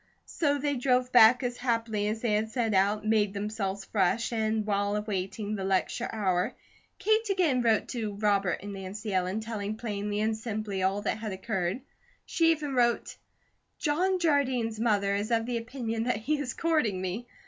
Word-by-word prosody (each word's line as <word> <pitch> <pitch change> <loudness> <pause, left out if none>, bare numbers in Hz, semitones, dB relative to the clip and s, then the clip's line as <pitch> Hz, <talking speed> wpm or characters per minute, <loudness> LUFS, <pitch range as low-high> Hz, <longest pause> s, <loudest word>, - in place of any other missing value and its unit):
So 290 -3 0
they 285 0 -1
drove 250 0 +1
back 245 +1 +7
as 245 0 -2
happily 230 -4 -1
as 220 +1 -2
they 235 - 0
had 215 +1 +1
set 225 -2 -1
out, 205 +2 +2
made 210 -2 +2
themselves 200 -1 -3
fresh, 215 +4 +1
and 220 -1 0
while 205 0 0
awaiting 210 0 -3
the 195 -2 -3
lecture 195 +5 0
hour, 185 -5 0 0.4
Kate 435 0 +1
again 340 -10 +2
wrote 225 -2 +2
to 220 -5 -3
Robert 200 -3 +1
and 205 0 -6
Nancy 195 +2 -6
Ellen, 185 +3 0
telling 215 -1 -4
plainly 210 -2 -3
and 220 +1 +1
simply 215 -3 -4
all 195 +2 0
that 215 - -1
had 215 -1 -4
occurred. 190 +2 -2 0.4
She 330 -1 +2
even 300 -4 0
wrote 240 -2 +1 0.6
"John 360 +5 +1
Jardine's 260 -9 +1
mother 205 -3 +2
is 205 +2 -1
of 225 -1 +1
the 240 0 -1
opinion 230 -1 -3
that 250 - +1
he 290 +8 -1
is 270 -3 -3
courting 305 - +1
me. 190 +6 -4
220 Hz, 175 wpm, -28 LUFS, 205-245 Hz, 0.6 s, back